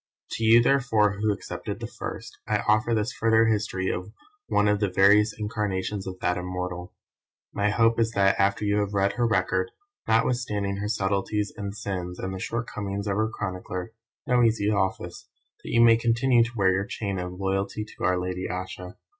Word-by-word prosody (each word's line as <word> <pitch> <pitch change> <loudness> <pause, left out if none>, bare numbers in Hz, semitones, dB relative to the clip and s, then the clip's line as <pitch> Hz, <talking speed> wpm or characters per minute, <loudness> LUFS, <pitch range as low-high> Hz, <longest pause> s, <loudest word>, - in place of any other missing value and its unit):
To 115 - -3
you 115 +1 +6
therefore 110 -7 +2
who 110 -1 +2
accepted 100 - -5
the - - -5
first, - - -7
I - - 0
offer 110 +2 +3
this 110 +3 -1
further 115 0 +3
history 105 -4 0
of 90 +3 -5 0.4
one 105 - +2
of 105 0 +2
the 100 -2 +1
various 105 +3 +5
incarnations 105 -2 -3
of 95 -1 -6
that 90 - +1
Immortal. 90 -1 -5 0.6
My 100 +1 +1
hope 115 +2 +3
is 115 -1 +3
that 100 -2 +3
after 100 +2 +2
you 105 0 +2
have 100 0 -2
read 100 0 +2
her 120 -1 +1
record, 95 -3 +1 0.4
notwithstanding 110 -4 0
her 105 +1 -3
subtleties 100 0 -1
and 100 -1 -6
sins 90 -3 -4
and 95 +1 -4
the 95 - -5
shortcomings 100 -3 -4
of 100 -2 -1
her 110 +2 +1
chronicler 90 -1 -5 0.3
(no 125 -1 +3
easy 110 -3 +2
office!) 95 -2 -2 0.3
you 115 - +2
may 115 -1 +7
continue 120 +1 +3
to 120 - -6
wear 95 -2 +4
your 95 +1 0
chain 100 -3 -4
of 90 0 -5
"loyalty 95 +2 -2
to 105 - -11
our 90 0 +2
lady 90 0 -3
Ayesha." 90 0 -6
100 Hz, 180 wpm, -26 LUFS, 95-110 Hz, 0.6 s, may